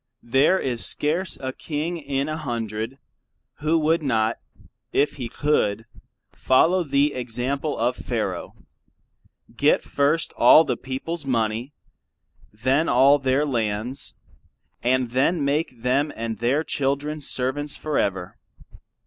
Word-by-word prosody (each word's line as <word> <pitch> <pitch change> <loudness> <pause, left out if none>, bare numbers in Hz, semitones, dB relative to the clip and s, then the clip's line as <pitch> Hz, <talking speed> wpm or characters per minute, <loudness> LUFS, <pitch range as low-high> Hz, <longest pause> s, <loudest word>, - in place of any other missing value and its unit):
There 135 +10 +3
is 125 -8 -1
scarce 170 +5 0
a 130 -1 -4
king 160 +4 -4
in 140 -1 -2
a 155 - -2
hundred 115 -3 -4 0.6
who 155 +2 +2
would 160 +1 +2
not, 115 -5 0 0.5
if 145 +1 +1
he 120 -4 -5
could, 115 -7 0 0.5
follow 170 +8 +3
the 140 0 +1
example 130 +4 -2
of 120 +2 0
Pharoah, - - -3 1.0
get - - +3
first 145 +3 0
all 160 - +7
the 125 - -1
peoples 135 +7 -5
money, 115 +1 -1 0.8
then 130 +9 +1
all 135 +4 +5
their 135 +2 +1
lands, 120 0 -2 0.7
and 125 0 +1
then 140 +5 +1
make 140 -4 -1
them 140 +4 +1
and 115 0 -4
their 130 +7 +1
children 145 +1 -2
servants 140 +2 -1
for 155 -1 -1
ever. 95 -2 -2
135 Hz, 125 wpm, -23 LUFS, 120-150 Hz, 1.0 s, all